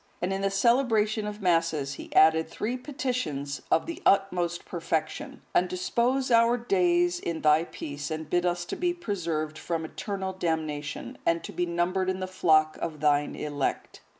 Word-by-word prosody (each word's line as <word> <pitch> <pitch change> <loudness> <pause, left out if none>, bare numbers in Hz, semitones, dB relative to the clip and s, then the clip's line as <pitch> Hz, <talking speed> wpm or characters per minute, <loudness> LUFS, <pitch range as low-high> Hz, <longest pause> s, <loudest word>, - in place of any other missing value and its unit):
And 180 +2 -1
in 195 - -2
the 195 - +2
celebration 215 0 +2
of 210 0 -6
Masses, 165 -5 +1
he - - -10
added 160 +1 +5
three 235 +4 -3
petitions 250 - -3
of - - +3
the 335 -1 -6
utmost 180 -3 +2
perfection: 175 - -3
"And 180 +1 +3
dispose 245 +8 0
our 230 +1 +5
days 350 +5 +2
in 165 - -4
thy 155 +2 +4
peace, 145 -3 -6
and 155 -1 -4
bid 175 +3 +1
us 175 -1 0
to - - -4
be 350 0 0
preserved 165 - -3
from 165 -1 -3
eternal 190 +3 -4
damnation, 155 -4 -3
and 170 0 +1
to - - -6
be 175 - -1
numbered 180 +2 0
in 185 0 -2
the 185 - -2
flock 155 -4 +3
of 155 -3 -4
thine 145 0 +2
elect." 145 -2 -3
175 Hz, 170 wpm, -27 LUFS, 155-225 Hz, -, added